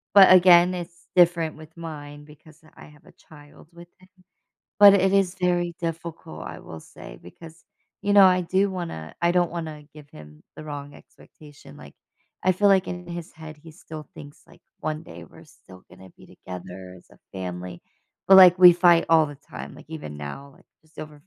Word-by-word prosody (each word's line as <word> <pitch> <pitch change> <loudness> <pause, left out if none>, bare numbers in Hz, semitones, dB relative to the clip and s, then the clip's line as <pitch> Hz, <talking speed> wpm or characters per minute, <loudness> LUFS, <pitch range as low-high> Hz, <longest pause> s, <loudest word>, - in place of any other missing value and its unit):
but, 190 -2 +8
again, 180 0 +5
it's 175 -1 -9
different 170 -2 +2
with 155 +1 -16
mine 145 -3 -10
because 155 +1 -19
I - - -14
have 150 +1 -20
a - - -18 0.2
child 145 0 -17
with 170 0 -15
him. 185 - -21 0.7
But 200 -1 +9
it 190 0 +1
is 195 -2 +1
very 175 -1 -1
difficult, 165 0 -7
I - - -9
will 80 - -11
say, - - -14
because, 160 - -15 0.4
you 205 - -1
know, 200 -1 +8
I 185 -1 +4
do 190 +3 0
wanna 165 - -7
I 170 0 +2
don't 175 -1 +1
wanna 160 -3 -7
give 150 -2 -15
him 75 0 -15
the 155 - -10
wrong 145 -1 -9
expectation, 145 - -18
like, 70 -1 -15 0.5
I 185 - +2
feel 205 +3 +1
like 190 -1 +2
in 180 0 -7
his 170 -1 -8
head, 160 -1 -12
he 165 +1 -15
still 155 -1 -12
thinks, 145 0 -14
like, - - -21 0.2
one 155 +1 -4
day, 85 - -13
we're - - -18
still 95 -1 -19
gonna 95 -1 -16
be - - -18
together 90 0 -11
as - - -24
a - - -21
family. 90 -1 -8 0.5
But, 190 - +8
like, 180 -1 +7
we 180 -1 +9
fight 175 -1 +4
all 160 -2 +4
the 145 -1 -11
time, 140 - -11
like, - - -16
even 150 - -8
now, 135 - -9
like, - - -25 0.2
just 155 0 -28
over 150 -1 -10
160 Hz, 195 wpm, -23 LUFS, 145-175 Hz, 0.7 s, But